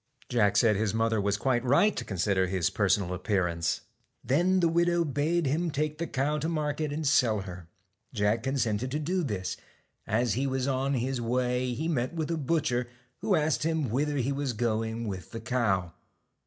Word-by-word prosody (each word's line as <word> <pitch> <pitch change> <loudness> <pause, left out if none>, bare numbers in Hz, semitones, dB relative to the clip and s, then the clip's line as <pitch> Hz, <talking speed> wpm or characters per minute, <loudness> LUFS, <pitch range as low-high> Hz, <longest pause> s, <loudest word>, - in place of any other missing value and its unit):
Jack 105 -5 +3
said 110 -1 +4
his 110 +1 0
mother 115 -1 +1
was 100 0 +1
quite 125 +1 +1
right 145 +11 +4
to - - -3
con 95 - -6
sider 95 0 +2
his 90 -3 0
personal 100 -3 +1
appearance. 90 -4 0 0.4
Then 180 +7 +2
the 170 - +3
widow 170 +1 +2
bade 155 +4 0
him 160 +6 0
take 150 +1 -2
the 170 - -2
cow 150 +3 0
to 160 +3 -1
market 150 -1 -1
and 155 +2 -3
sell 115 -7 +3
her. 90 -3 -9 0.4
Jack 105 +2 +1
consented 130 -3 -1
to 140 - -2
do 180 +5 0
this. 105 - -3 0.5
As 115 +1 +1
he 135 +4 0
was 130 0 -1
on 135 +1 0
his 130 0 -1
way 125 +1 0
he 155 +6 -2
met 140 -1 -1
with 160 0 -2
a 165 - 0
butcher, 130 -5 0 0.3
who 200 0 +2
asked 150 -6 +1
him 160 -6 0
whither 145 +4 0
he 135 +1 0
was 140 -2 -2
going 115 0 -1
with 95 -4 -5
the 115 - -6
cow. 105 -7 0
125 Hz, 190 wpm, -28 LUFS, 110-150 Hz, 0.5 s, said